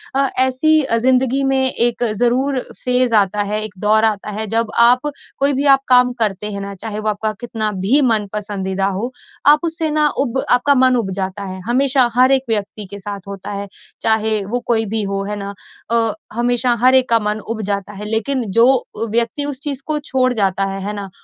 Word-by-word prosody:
अ, 275 0 +2
ऐसी 260 +5 +3
अ, 230 -4 +1
ज़िंदगी 260 +2 +2
में 270 -1 +1
एक 240 0 +1 0.2
ज़रूर 260 +3 +1 0.2
फेज़ 250 -2 +2
आता 205 0 +2
है, 210 +1 -2
एक 215 - -8
दौर 215 +2 +3
आता 215 -1 -1
है 220 - -2
जब 225 +1 -1
आप 250 +5 +5 0.3
कोई 280 +1 +2
भी 275 +2 -1
आप 270 - -8
काम 250 -1 +4
करते 210 0 -2
हैं 200 -1 -5
ना, 200 0 -7
चाहे 210 +2 -5
वो 215 0 -1
आपका 215 +1 -2
कितना 220 -3 -2
भी 270 +9 +4
मन-पसंदीदा 200 -2 -3
हो, 240 +4 -4 0.4
आप 295 +1 +7
उससे 325 -1 -1
ना 300 0 +2
उब 265 -1 -1
आपका 280 +3 +4
मन 255 -1 +4
उब 220 -6 -1
जाता 190 +2 -4
है। 190 -1 -6
हमेशा 260 0 +2
हर 255 +2 +4
एक 265 -1 +2
व्यक्ति 210 -1 -2
के 200 - -7
साथ 200 0 -7
होता 200 -1 -9
है, 200 0 -5 0.3
चाहे 220 -1 +2
वो 240 +5 -2
कोई 225 -2 +2
भी 220 +1 -1
हो, 195 0 -3
है 210 - -3
ना? 200 0 -6 0.4
अ, 230 -2 +2 0.2
हमेशा 245 +1 +1
हर 255 +1 +5
एक 260 -1 +3
का 230 -1 +4
मन 210 0 -2
उब 225 -1 -3
जाता 200 0 -3
है 205 +1 -7
लेकिन 225 +5 -1 0.2
जो 230 - +7 0.5
व्यक्ति 235 +5 0
उस 285 -3 -5
चीज़ 285 -3 -3
को 305 -1 -1
छोड़ 260 -3 0
जाता 195 -3 0
है, 195 0 -5
है 205 - -3
ना? 200 -2 -6
230 Hz, 210 wpm, -18 LUFS, 205-260 Hz, 0.5 s, आप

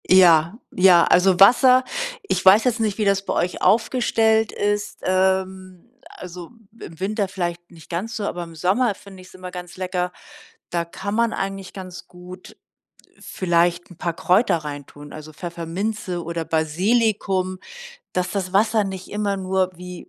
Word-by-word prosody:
Ja, 175 0 +5 0.2
ja, 180 -2 +6
also, 180 0 +3
Wasser 255 +5 +6 0.4
ich 190 - -2
weiß 195 +4 +7
jetzt 250 -2 0
nicht, 215 -3 -1
wie 215 - 0
das 195 -1 +2
bei - - -2
euch 180 - -2
aufgestellt 220 +1 +2
ist, 205 0 -2
ähm, 185 0 -1 0.2
also, 180 -1 -10 0.3
im 160 - -11
Winter 200 +1 -1
vielleicht 175 -2 -5
nicht 165 -3 -16
ganz 200 +7 -4
so, 215 - -4
aber 175 -3 -4
im 165 -1 -11
Sommer 200 +7 +1
finde 195 -1 -14
ich's 185 - -16
immer 185 -1 -9
ganz 180 -1 -9
lecker. 180 -1 -2 0.6
Da 170 -1 -1
kann 195 +4 -6
man 230 0 +1
eigentlich 195 -1 -5
ganz 185 -2 -9
gut 180 +1 -13 0.6
vielleicht 175 0 0
'n 175 - -14
paar 170 -1 -2
Kräuter 185 +2 +2
reintun, 145 -1 -9
also, 155 0 -10
Pfefferminze 175 +3 -4
oder 165 0 -4
Basilikum, 185 +3 0 0.5
dass 180 0 -1
das 185 -3 -3
Wasser 215 +2 +3
nicht 190 -1 -6
immer 205 -1 -1
nur 190 -1 0
wie 180 0 -10
185 Hz, 155 wpm, -22 LUFS, 175-205 Hz, 0.6 s, weiß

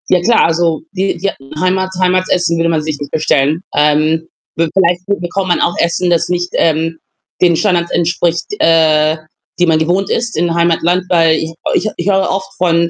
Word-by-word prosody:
Ja 180 - +3
klar, 230 +6 +3
also, 165 -1 0
die 195 +1 -1
die 195 +3 -1 0.3
Heimat 185 +1 0
Heimatsessen 180 -2 +1
würde 165 0 +1
man 160 -2 0
sich 150 -1 -4
nicht 145 - -7
bestellen. 155 0 +1
Ähm, 155 +2 +2 0.3
we 165 0 0
vielleicht 180 -2 +2
bekommt 190 -1 -2
man 175 - +1
auch 175 - +1
Essen, 170 +1 0
das 170 -1 +1
nicht, 175 0 -1
ähm, 165 0 0 0.4
den 175 -2 +4
Standards 175 -2 0
entspricht, 170 0 0
äh, 155 -1 +3 0.4
die 180 - +4
man 160 -2 +2
gewohnt 180 +5 0
ist 235 -5 -2
in 170 +1 0
Heimatland, 170 +1 +1
weil 165 -2 +4
ich 160 +1 -4 0.2
ich - - +1
ich 175 +4 -2
höre 195 -1 +2
oft 190 0 -3
von 170 -1 +1
170 Hz, 180 wpm, -14 LUFS, 160-180 Hz, 0.4 s, den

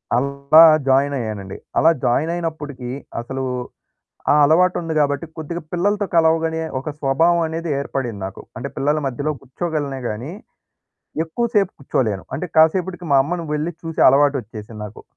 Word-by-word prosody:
అలా 140 +4 +4 0.3
జాయినయ్యానండి. 125 -8 0 0.2
అలా 165 +2 +6
జాయిన్ 150 +7 +1
అయినప్పుడికీ 150 -7 -5 0.3
అసలూ 135 +2 -5 0.9
ఆ - - +5
అలవాటుంది 165 +1 +2
గాబట్టి 145 +2 +1
కొద్దిగా 165 +2 -5
పిల్లలతో 205 +3 +1
కలవగనే 160 0 +3 0.2
ఒక 150 - -5
స్వభావమనేది 165 +3 +1
ఏర్పడింది 125 -7 -4
నాకు. 95 - -9
అంటే 135 +3 -4
పిల్లల 150 +2 +1
మధ్యలో 140 +4 -2
కుచ్చోగలనే 145 -1 -3
గాని, 120 +10 -5 0.9
ఎక్కువ 235 +9 -2
సేపు 195 -3 +3
కుచ్చోలేను. 110 -7 -1
అంటే 180 - -4
కాసేపటికి 175 +2 +3
మా 140 - +6
అమ్మను 170 +2 -3
వెళ్లి 155 +3 -2
చూసే 165 -1 0
అలవాటొచ్చేసింది 120 -6 0
నాకు. 105 - -11
150 Hz, 125 wpm, -20 LUFS, 135-165 Hz, 0.9 s, అలా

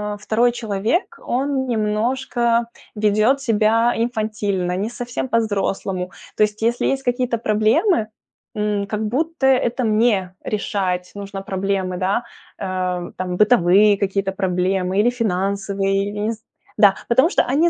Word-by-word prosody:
э, - - -11
второй 235 +2 +2
человек, 225 - -2
он 265 +1 -1
немножко 235 +1 0 0.3
ведет 215 +6 +2
себя 230 0 +2
инфантильно, 215 -6 -1
не 205 +4 -2
совсем 240 +2 -4
по-взрослому. 195 -5 -1 0.3
То - - -1
есть 210 +1 -1
если 235 +1 +1
есть 270 0 -1
какие-то 245 -1 0
проблемы, 220 - +2 0.5
м, 210 -1 -1
как 215 +1 -2
будто 305 +5 -1
это 255 -1 +2
мне 215 -4 +2
решать 190 -4 -2
нужно 200 -1 -6
проблемы, 190 -1 -2
да. 190 +6 0 0.4
Э, 185 -2 -3
там, 180 -1 -3
бытовые 210 -2 +5
какие-то 195 -1 0
проблемы 185 0 0
или 230 - +4
финансовые, 195 -2 -1
или 205 - -7
нез 220 +1 -3 0.3
Да, 200 -2 +6
потому 260 +7 +4
что - - +2
они 305 +7 +2
215 Hz, 130 wpm, -20 LUFS, 195-235 Hz, 0.5 s, Да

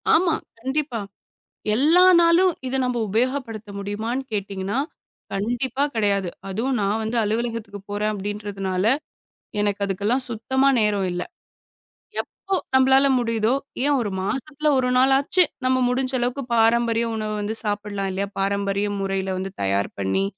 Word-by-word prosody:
ஆமா. 335 -1 +3 0.3
கண்டிப்பா. 265 -1 -1 0.8
எல்லா 310 +9 +5 0.2
நாளும் 340 +2 +5
இத 255 - -3
நம்ப 250 -1 -1
உபயோகப்படுத்த 230 -1 -1
முடியுமான்னு 220 +6 -3
கேட்டீங்கன்னா 200 +1 -2 0.5
கண்டிப்பா 245 +6 -1
கெடையாது. 200 -4 +1 0.2
அதுவும் 235 +7 -1
நான் 205 +2 0
வந்து 220 +2 -2
அலுவலகத்துக்கு 220 -1 -2
போறேன் 210 +1 0
அப்டின்றதுனால, 200 -2 -3 0.8
எனக்கு 205 -1 0
அதுக்கெல்லாம் 205 +7 0
சுத்தமா 260 +4 +1
நேரம் 205 -3 +2
இல்ல. 175 0 -3 1.0
எப்போ 390 0 -5 0.2
நம்மளால 265 +1 +5
முடியுதோ, 230 -1 +1 0.3
ஏன் 290 0 +3
ஒரு 215 -4 -2
மாசத்துல 280 +8 -2
ஒரு 255 -1 +1
நாளாச்சு 270 +7 +4 0.2
நம்ம 255 0 +3
முடிஞ்ச 255 +1 0
அளவுக்கு 245 +3 -1
பாரம்பரிய 230 0 +3
உணவு 215 -1 -2
வந்து 210 +2 -2
சாப்பிடலாம் 205 -2 -2
இல்லையா? 200 +1 -2
பாரம்பரிய 200 +1 0
முறையில 195 -1 -1
வந்து 190 0 -4
தயார் 100 +1 +1
பண்ணி, 95 - +1
220 Hz, 125 wpm, -23 LUFS, 200-260 Hz, 1.0 s, எல்லா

